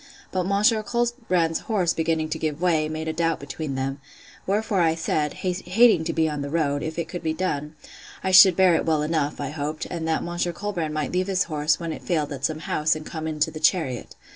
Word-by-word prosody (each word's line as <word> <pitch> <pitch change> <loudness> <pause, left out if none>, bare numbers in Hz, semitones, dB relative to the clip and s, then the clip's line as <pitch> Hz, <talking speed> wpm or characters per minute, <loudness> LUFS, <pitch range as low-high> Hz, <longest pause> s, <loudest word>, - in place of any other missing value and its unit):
But 185 -1 -1
Monsieur 210 +3 +3
Colbrand's 225 -8 0
horse 185 -6 0
beginning 160 -1 -1
to - - -3
give 155 -1 -2
way, 160 -4 +1
made 160 0 -4
a 160 - -1
doubt 165 0 0
between 140 0 -5
them: 135 +1 -3 0.5
wherefore 200 -1 +1
I 165 -1 +3
said, 155 -2 -1
(hating 185 +1 +2
to 165 - -1
be 160 -1 +1
on 150 -2 -3
the 140 - -4
road,) 145 -2 0
if 160 +1 -5
it 170 -1 -2
could 175 +1 -6
be 160 -1 -1
done, 150 -4 -3 0.5
I 190 - 0
should 185 -1 +9
bear 185 -1 +5
it - - +2
well 155 -2 +2
enough, 150 -2 -1
I 140 -2 -3
hoped; 150 +1 -4
and 165 -2 -3
that 160 - 0
Monsieur 175 0 -2
Colbrand 170 -5 -3
might 155 -1 -2
leave 185 +1 0
his 190 -2 +2
horse, 150 -1 0
when 165 -2 -4
it - - -8
failed, 155 -5 -1
at 135 -1 -3
some 155 0 -2
house, 155 0 +1
and 155 0 -7
come 160 -1 -5
into 155 0 0
the 155 - -7
chariot. 155 -6 0
160 Hz, 225 wpm, -24 LUFS, 155-180 Hz, 0.5 s, should